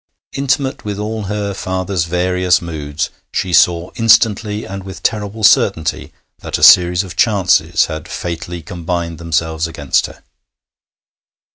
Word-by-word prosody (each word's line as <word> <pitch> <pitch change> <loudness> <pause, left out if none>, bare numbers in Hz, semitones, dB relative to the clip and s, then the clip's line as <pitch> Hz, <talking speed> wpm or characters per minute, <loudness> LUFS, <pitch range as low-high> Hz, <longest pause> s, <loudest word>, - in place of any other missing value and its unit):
Intimate 135 0 -1
with 105 -1 -4
all 105 0 -4
her 100 0 -3
father's 95 -2 -2
various 90 +1 +1
moods, 80 -2 -4 0.2
she 90 -1 -2
saw 85 +1 +3
instantly 110 -2 +2
and 95 0 -7
with 95 0 -10
terrible 105 0 -2
certainty 80 -5 +2 0.3
that - - -4
a - - -4
series 90 +1 +6
of 95 - -9
chances 95 -6 +2
had 80 0 -7
fatally 85 0 -6
combined 85 0 -4
themselves 80 -1 -1
against 75 -4 -1
her. - - -15
90 Hz, 130 wpm, -16 LUFS, 85-105 Hz, 0.3 s, series